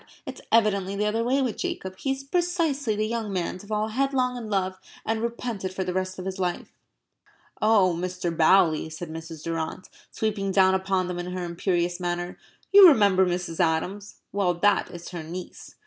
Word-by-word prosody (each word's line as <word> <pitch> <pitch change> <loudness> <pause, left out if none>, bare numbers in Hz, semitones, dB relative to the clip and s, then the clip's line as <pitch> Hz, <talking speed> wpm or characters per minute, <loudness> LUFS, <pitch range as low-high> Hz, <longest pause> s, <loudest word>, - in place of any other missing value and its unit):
It's - - -8
evidently 200 -4 +2
the 210 +1 0
other 220 +2 0
way 265 +3 +2
with 245 -4 -2
Jacob. 190 0 -4
He 270 - 0
is 270 0 -8
precisely 310 -6 0
the 215 +1 0
young 225 -2 -3
man 185 -1 -2
to 205 - -13
fall 215 0 -1
headlong 255 +1 0
in 230 -3 -6
love 190 -2 -1 0.3
and 220 0 -1
repent 235 -3 -4
it 185 - -2
for 190 - -1
the 180 -1 -3
rest 185 0 -2
of 185 - -6
his 190 0 -4
life." 180 -1 -2 0.9
"Oh, 210 -4 +4
Mr. 180 -1 -3
Bowley," 160 -1 +4
said 160 +1 -7
Mrs. 160 -1 -8
Durrant, 165 +2 -4 0.2
sweeping 205 -3 -2
down 190 -1 +4
upon 190 -1 0
them 180 -1 -4
in 180 +1 -5
her 185 -1 -3
imperious 175 0 -1
manner, 175 0 -3 0.3
"you 400 -1 +11
remember 200 - +5
Mrs. 175 -2 -3
Adams? 180 +4 -1 0.2
Well, 190 -3 +1
that 205 +4 +2
is 175 0 -9
her 175 -2 -6
niece." 175 +3 -9
190 Hz, 190 wpm, -25 LUFS, 175-220 Hz, 0.9 s, you